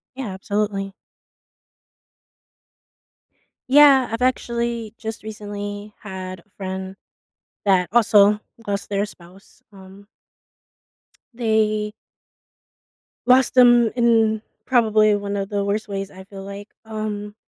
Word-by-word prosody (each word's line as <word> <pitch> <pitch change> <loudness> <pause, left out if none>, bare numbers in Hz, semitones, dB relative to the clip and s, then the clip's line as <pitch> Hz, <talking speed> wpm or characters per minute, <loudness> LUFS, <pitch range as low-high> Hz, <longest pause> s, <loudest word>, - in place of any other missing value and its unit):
Yeah, 245 -8 -5
absolutely. 195 0 -2 2.8
Yeah, 275 -2 +7
I've 230 +2 -3
actually 235 -3 -1
just 220 -2 -6
recently 205 -1 -7
had 185 -3 -7
a 205 - -30
friend 190 0 -5 0.7
that 190 -3 +3
also 210 -2 +5 0.3
lost 200 0 -3
their 200 0 0
spouse, 185 0 -17
um 195 +1 -15 1.3
they 215 -2 0 1.3
lost 255 0 +4
them 240 -2 +6
in 225 -2 +3 0.3
probably 215 -4 +4
one 200 0 -4
of 195 0 -3
the 200 -1 -1
worst 210 +2 -2
ways, 195 -1 -4
I 190 0 -12
feel 195 0 -10
like, 200 +1 -9 0.2
um 215 -1 -5
210 Hz, 105 wpm, -22 LUFS, 200-225 Hz, 2.8 s, Yeah